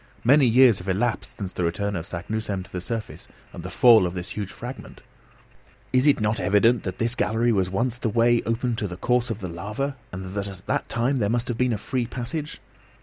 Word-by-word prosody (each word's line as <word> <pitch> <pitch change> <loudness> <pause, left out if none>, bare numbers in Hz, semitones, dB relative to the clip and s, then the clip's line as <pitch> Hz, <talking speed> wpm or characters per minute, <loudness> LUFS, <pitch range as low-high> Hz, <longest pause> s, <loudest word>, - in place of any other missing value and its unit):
Many 135 +2 +5
years 120 -2 +6
have 90 +2 -6
elapsed 110 +5 -1
since 95 -3 -5
the 90 - -2
return 100 +4 -1
of 85 0 -5
Saknussemm 100 +2 -4
to - - -17
the 90 - -4
surface 115 +2 -5 0.3
and - - -7
the 90 - -6
fall 115 -2 +6
of 90 - -6
this 90 +4 -5
huge 100 -2 -4
fragment. 125 +5 -9 0.9
Is 130 +3 +4
it 145 - +4
not 105 0 0
evident 105 +6 +3
that 95 -1 -5
this 115 0 +1
gallery 115 +1 +1
was 95 -4 +1
once 120 +6 -1
the 115 - -1
way 120 +2 +3
open 115 +1 0
to 105 - -2
the 90 -1 -7
course 125 +3 +1
of 110 -2 -4
the 95 - -4
lava, 105 +11 -4 0.2
and 95 +1 -6
that 100 0 -3
at 95 -2 -10
that - - -1
time 125 +4 0
there 100 -3 +1
must 120 +2 -1
have 120 - -2
been 125 -1 +2
a 110 - 0
free 120 +3 -2
passage? 145 +5 -4
110 Hz, 225 wpm, -24 LUFS, 95-120 Hz, 0.9 s, years